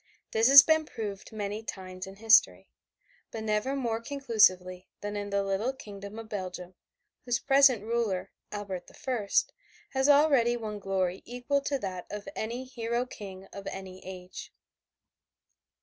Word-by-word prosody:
This 225 +1 +3
has 275 +1 +11
been 315 -1 +3
proved 205 -3 -6
many 210 0 -4
times 185 -3 -7
in 195 - -10
history, 225 +2 +4 0.6
but 220 -1 -6
never 215 +5 0
more 230 -4 -1
conclusively 210 -9 +2
than 205 0 -4
in 205 0 -4
the 200 0 0
little 195 +6 -1
kingdom 200 -3 -10
of 225 -1 -7
Belgium, 185 -3 -6 0.5
whose 245 -1 +1
present 270 -5 +4
ruler, 225 -5 -1 0.2
Albert 195 -4 -5
the - - -16
First, 230 -6 0 0.4
has 265 +1 +1
already 280 -5 +5
won 215 -2 -5
glory 190 -2 -1
equal 250 +4 -1
to 280 0 -1
that 185 -6 -6
of 205 0 -7
any 235 +4 -3
hero 240 -1 -2
king 195 -6 -9
of 200 0 -8
any 190 -1 -7
age. 180 -1 -9
215 Hz, 150 wpm, -29 LUFS, 195-245 Hz, 0.6 s, has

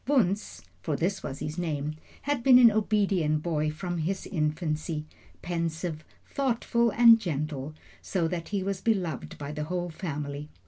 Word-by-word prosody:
Wunzh, 210 -8 +1 0.2
for 155 - -1
this 180 +7 -1
was 135 - -5
his 155 +4 -4
name, 150 -3 -2 0.3
had 290 -3 0
been 255 0 +7
an 240 -2 +8
obedient 195 -8 +1
boy 155 -3 0
from 175 +3 -4
his 185 +5 -2
infancy 155 -1 -2 0.4
pensive, 165 -2 -3 0.2
thoughtful, 235 -3 +1
and 230 +1 +7
gentle 150 -5 -3 0.3
so 175 -4 0
that 170 0 -4
he 200 -2 -1
was 195 -1 -2
beloved 185 - -1
by 145 0 -5
the 150 0 -3
whole 175 +1 -3
family. 150 -3 -5
170 Hz, 150 wpm, -28 LUFS, 155-200 Hz, 0.4 s, an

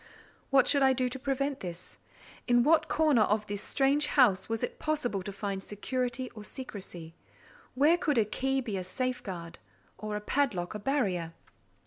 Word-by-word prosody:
What 270 -1 +5
should 280 - +4
I 265 -1 +5
do 255 0 0
to 265 +2 -5
prevent 275 +1 -1
this? 175 -1 -8 0.5
In 240 -1 +5
what 315 +4 +4
corner 305 -7 +3
of 210 0 +2
this 205 -1 -4
strange 285 +4 +2
house 230 -10 +3
was 225 -1 -2
it - - -3
possible 285 -10 -1
to 200 - -6
find 195 -1 -4
security 250 +5 -3
or 215 -2 -10
secresy? 190 - -8 0.6
Where 305 +6 +4
could 295 -7 +1
a 220 - +4
key 265 +5 -1
be 220 -6 -3
a 185 - -3
safeguard, 185 -5 -4 0.4
or 215 -1 -4
a - - -1
padlock 210 -6 0
a 210 - -5
barrier? 195 - -1
240 Hz, 170 wpm, -30 LUFS, 200-270 Hz, 0.6 s, What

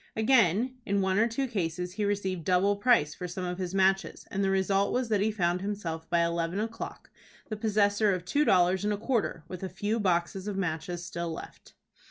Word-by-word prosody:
Again, 230 +1 +3
in 200 -1 0
one 190 +1 +1
or 225 - +4
two 240 +4 -1
cases 180 -5 -3
he 210 +2 -1
received 190 -4 -1
double 185 +4 +3
price 200 -9 +3
for 180 - -6
some 180 +1 -5
of 180 +1 -4
his 185 0 -3
matches, 195 0 +1
and 200 -2 -1
the 195 - +2
result 195 +1 +2
was 250 -2 -1
that 210 -3 +2
he 215 - +2
found 180 -3 0
himself 170 -6 -4
by 170 0 +3
eleven 170 +2 -1
o'clock 225 +1 -6 0.4
the 215 - -2
possessor 210 -1 +2
of 180 -2 -2
two 285 +11 +2
dollars 185 -5 +3
and 210 - +1
a - - -2
quarter, 225 - -1
with 185 -1 -7
a 190 - -4
few 205 +5 -2
boxes 185 0 0
of 205 -2 -3
matches 175 -1 -3
still 170 -1 -4
left. 160 - -10
195 Hz, 210 wpm, -29 LUFS, 175-210 Hz, 0.4 s, or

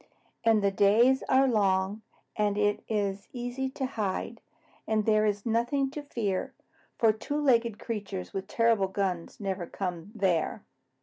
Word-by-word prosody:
"And 225 -2 +4
the 200 - +3
days 225 +7 +4
are 265 +1 +5
long, 200 -2 +1 0.3
and 205 -1 +1
it 205 0 +1
is 200 -2 -1
easy 245 +2 -3
to 265 0 -3
hide, 225 -1 -3 0.5
and 215 -1 +1
there 215 -1 +3
is 205 -1 -2
nothing 240 +4 +1
to 295 - -5
fear, 215 -9 -3 0.4
for 225 -2 +4
two 285 +7 -3
legged 235 -6 +2
creatures 200 -5 -5
with 195 0 -4
terrible 225 -2 +2
guns 190 -3 -3
never 190 -4 -3
come 180 0 -5
there." 190 -1 0
215 Hz, 145 wpm, -29 LUFS, 195-235 Hz, 0.5 s, are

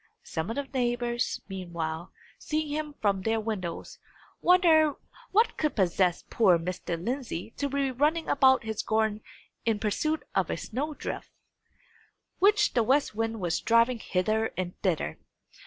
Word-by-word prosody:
Some 160 +4 -4
of 225 - -3
the 285 - -1
neighbours, 240 -2 -1
meanwhile, 170 -3 -5 0.3
seeing 310 0 -2
him 300 0 -3
from 200 -2 +2
their 225 +3 +1
windows, 205 -6 -4 0.4
wondered 325 -5 +5 0.4
what 445 +4 +3
could 305 -1 0
possess 180 -2 +1
poor 190 -7 +4
Mr. 170 0 -4
Lindsey 230 -2 -4
to 285 - -1
be 275 -1 0
running 300 +6 +1
about 265 -2 +4
his 220 -1 -3
garden 220 -1 0 0.4
in 225 -2 +1
pursuit 265 +9 -1
of - - +1
a - - -1
snow 290 +6 -4
drift, - - -5 1.1
which 415 +3 +4
the 240 - +3
west 265 +4 +2
wind 225 +1 -2
was 175 -2 0
driving 230 +1 +3
hither 215 +4 0
and 180 -1 -2
thither! 180 -6 -1
225 Hz, 145 wpm, -28 LUFS, 190-285 Hz, 1.1 s, wondered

